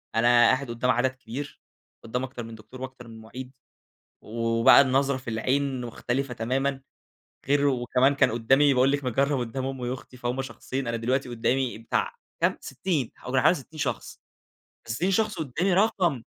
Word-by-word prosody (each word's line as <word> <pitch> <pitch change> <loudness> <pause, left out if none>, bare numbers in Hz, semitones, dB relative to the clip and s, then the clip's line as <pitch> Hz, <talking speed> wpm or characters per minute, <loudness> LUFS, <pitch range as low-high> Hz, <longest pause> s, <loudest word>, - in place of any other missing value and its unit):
أنا 115 +1 +3
قاعد 120 +2 +4
قُدّام 120 +2 +1
عدد 125 +2 +2
كبير، 130 +2 -8 0.4
قُدّام 125 +3 -3
أكتر 125 -2 -6
من 115 0 -9
دكتور 110 +4 -13
وأكتر 130 -2 -8
من 115 -1 -11
مُعيد، 125 +4 -9 0.7
وبقى 115 +3 +5
النظرة 135 0 +2
في 125 -3 -6
العين 130 +3 0
مختلفة 125 +2 -3
تمامًا 135 +4 -1 0.7
غير 145 0 +3
وكمان 130 +1 +2
كان 140 - +3
قُدّامي 135 +5 +4
باقول 130 +2 +4
لِك 145 -1 -1
مِجَرّب 135 +3 +1
قُدّام 130 +2 -3
أمي 130 -2 -3
وأختي 130 0 -8
فهُم 125 +2 -2
شخصين 130 +1 -5
أنا 115 - -1
دلوقتي 125 +3 -1
قُدّامي 120 +1 0
بتاع 115 - -1 0.3
كام؟ - - +2
60 155 -11 -2
كانوا 130 0 +1
حوالي 180 - +5
60 155 +1 -10
شخص. 145 - -3 0.7
ف60 165 +12 0
شخص 210 -1 +1
قُدّامي 165 +6 0
رقم، 180 - +2
130 Hz, 160 wpm, -26 LUFS, 120-140 Hz, 0.7 s, وبقى